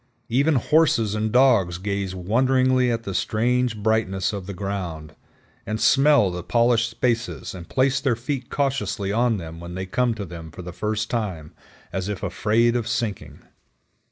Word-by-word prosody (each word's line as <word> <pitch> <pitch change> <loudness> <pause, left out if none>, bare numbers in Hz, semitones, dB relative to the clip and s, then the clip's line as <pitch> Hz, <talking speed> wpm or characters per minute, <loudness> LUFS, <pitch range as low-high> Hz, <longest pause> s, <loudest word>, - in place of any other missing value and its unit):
Even 140 +6 +2
horses 125 -6 +3
and 110 0 -1
dogs 115 -9 +4
gaze 100 0 -3
wonderingly 130 +6 +2
at 115 0 -2
the 100 - -5
strange 120 +4 0
brightness 105 -3 0
of 100 -3 -5
the 100 - -5
ground, 90 -6 -5 0.5
and 110 0 -3
smell 135 -8 +4
the 90 0 -5
polished 115 +3 +2
spaces 115 +1 -2
and 90 -2 -10
place 130 0 +2
their 130 -5 +1
feet 125 +2 -4
cautiously 120 -8 -1
on 115 +1 +2
them 80 -2 -8
when 85 +1 -8
they 95 0 -4
come 120 +5 0
to 105 -2 -5
them 85 -2 -9
for 90 +3 -10
the 90 0 -8
first 110 +3 -2
time, 95 -10 -3 0.4
as 95 +1 -2
if 100 -2 -5
afraid 115 +3 +1
of 120 -2 -1
sinking. 105 -11 -3
110 Hz, 165 wpm, -23 LUFS, 95-125 Hz, 0.5 s, dogs